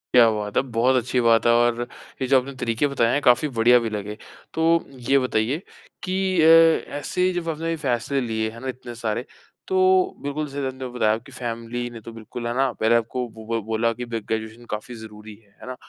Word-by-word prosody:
क्या 115 -2 +8
बात 105 -1 -3
है। - - +5
बहुत 125 +3 +3
अच्छी 125 +1 0
बात 115 -1 +4
है 120 - +5
और 120 0 +2 0.4
ये 130 - 0
जो 135 0 +5
आपने 135 +2 -7
तरीक़े 120 +3 0
बताएँ 120 -4 +1
हैं 145 - +1
काफ़ी 125 +3 +4
बढ़िया 120 +2 +6
भी 115 -1 -3
लगे। 105 0 -5 0.4
तो 160 - -1 0.5
ये 140 - +5
बताइए 125 +1 0 0.5
कि 185 -1 0
अ, 155 - +5 0.5
ऐसे 145 +5 -2
ही 185 - +2
जब 175 -2 -3
आपने 165 +1 -2
फ़ैसले 135 -1 -1
लिए 110 -2 -2
हैं 115 - -11
ना 130 - -6
इतने 125 -2 -7
सारे 115 +1 -3 0.4
तो 185 0 +3
बिल्कुल 145 +2 -2
जैसे 140 -1 -3
आपने 130 0 -5
बताया 115 -3 +1
आपकी 115 +5 -7
फ़ैमिली 120 -1 -4
ने 115 -2 -10
तो 115 - -9
बिल्कुल 115 +1 -7
है 120 - -2
ना 135 -1 +2
पहले 115 +1 +3
आपको 120 +2 -1
बो 110 +1 -3
बोला 110 +2 0
कि 125 +2 -6
ग्रेजुएशन 110 0 -4
काफ़ी 120 +3 -8
ज़रूरी 110 -1 -11
है। 100 -2 -27
है - - -10
ना? 130 - -5
120 Hz, 210 wpm, -23 LUFS, 115-135 Hz, 0.5 s, क्या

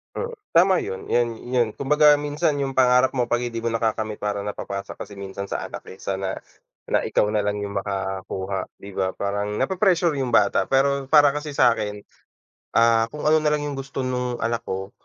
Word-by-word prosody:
Mm, 475 0 -4 0.2
tama 185 +3 +5
yun, 95 - -6
yun 120 -2 0
yun 120 -2 0
kumbaga 150 +2 +4
minsan 145 0 0
yung 135 -1 -2
pangarap 125 0 +4
mo 120 -2 -1
'pag 120 0 +1
hindi 115 -1 -5
mo 115 - 0
nakakamit 110 -2 -1
parang 105 -1 -2
napapasa 100 -1 -5
kasi 100 0 -8
minsan 100 0 -6
sa - - -3
anak - - -8
eh, - - -9
sana 95 0 -3 0.6
na - - +4
ikaw 105 - +1
nalang 105 -1 -1
yung 100 0 -2
makakuha, 95 -1 -4
di 100 - -11
ba? 95 -1 -2
Parang 100 +1 -2
nape-pressure 180 - +2
yung 125 -3 -2
bata. 100 - +3
Pero 140 0 +2
para 145 0 +6
kasi 150 0 -5
sa'kin, 105 -4 +2 0.7
ah, 115 0 +5
kung 150 +3 -7
ano 155 +1 +4
nalang 150 -1 +1
yung 145 -2 -4
gusto 135 0 -4
nung 125 -1 -2
anak 115 0 0
ko, 95 +1 -4
120 Hz, 185 wpm, -23 LUFS, 100-140 Hz, 0.7 s, para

